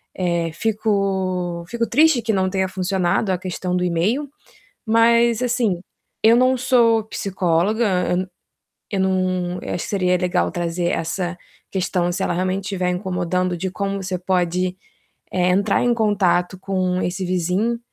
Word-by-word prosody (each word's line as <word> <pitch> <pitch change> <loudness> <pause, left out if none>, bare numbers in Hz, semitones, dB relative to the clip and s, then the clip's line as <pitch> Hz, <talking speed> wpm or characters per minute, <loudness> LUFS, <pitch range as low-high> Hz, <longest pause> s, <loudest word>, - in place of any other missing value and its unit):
Eh, 170 -2 -1
fico 190 -5 -1
fico 235 +1 -2
triste 300 -1 +4
que 220 -1 -1
não 190 -1 +1
tenha 190 0 0
funcionado 190 +1 0
a 185 - +1
questão 180 0 -3
do 180 - 0
e-mail, 200 - 0 0.6
mas, 235 +1 +4
assim, 235 -8 0 0.4
eu 225 +2 +7
não 255 +1 +3
sou 235 -3 +3
psicóloga, 185 -1 0 0.6
eu 195 -2 -1
não 185 -1 0
eu - - -4
acho 175 - -3
que - - -7
seria 180 -2 +2
legal 180 0 0
trazer 175 0 -1
essa 175 +2 -2 0.3
questão, 180 -2 0
se 190 +2 -3
ela - - 0
realmente 185 +2 -1
tiver 185 -3 -1
incomodando, 180 -1 -1
de 190 +2 -3
como 200 -1 -2
você 185 0 -2
pode, 180 0 0 0.6
eh, 180 -1 +1
entrar 195 +2 +2
em 245 - +3
contato 195 -5 +1
com 185 -1 -1
esse 180 +1 -2
vizinho 185 +6 0
185 Hz, 145 wpm, -21 LUFS, 180-215 Hz, 0.6 s, eu